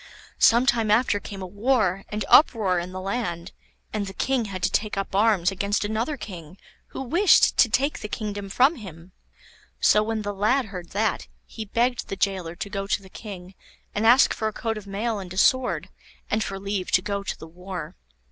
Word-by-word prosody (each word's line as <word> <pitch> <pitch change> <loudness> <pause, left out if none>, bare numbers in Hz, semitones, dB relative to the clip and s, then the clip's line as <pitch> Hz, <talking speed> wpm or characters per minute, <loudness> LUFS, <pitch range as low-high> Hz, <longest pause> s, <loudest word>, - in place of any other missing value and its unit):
Some 235 +3 +5
time 230 -4 +2
after 215 -1 +3
came 195 -1 -8
a - - -4
war 200 -1 0
and 210 -1 -3
uproar 205 - +5
in 175 +1 -6
the 185 - -6
land, 185 -3 -3 0.4
and 210 -2 -2
the 195 - -8
King 260 -4 0
had 185 -3 -6
to - - +2
take 210 -2 -1
up 195 -1 -3
arms 200 -3 +3
against 200 +2 -1
another 225 +8 -2
king 175 -6 -9 0.3
who - - -6
wished 345 +10 +4
to 235 - +5
take 275 +6 0
the - - -5
kingdom 205 -3 -5
from 265 +10 +3
him. 180 -5 -11 0.7
So 210 - +5
when 220 0 -2
the 205 0 -3
lad 220 +7 +1
heard 180 -4 -8
that, 210 -1 -1 0.2
he 220 - -7
begged 240 +4 0
the - - -4
gaoler 185 -4 -1
to 195 - -5
go 195 -1 -3
to 205 - +1
the 190 -1 -15
King 185 -3 -9 0.4
and 210 - -1
ask 250 +4 +6
for 220 - -2
a 215 - -3
coat 225 0 -3
of 210 -2 -9
mail 210 +2 -2
and 185 -2 -8
a - - -9
sword, 260 +5 +2 0.4
and 215 +1 +1
for 195 -1 -5
leave 195 -1 -3
to 180 - +4
go 200 -1 -2
to 200 - -5
the - - -10
war. 180 +3 -8
205 Hz, 205 wpm, -24 LUFS, 190-225 Hz, 0.7 s, ask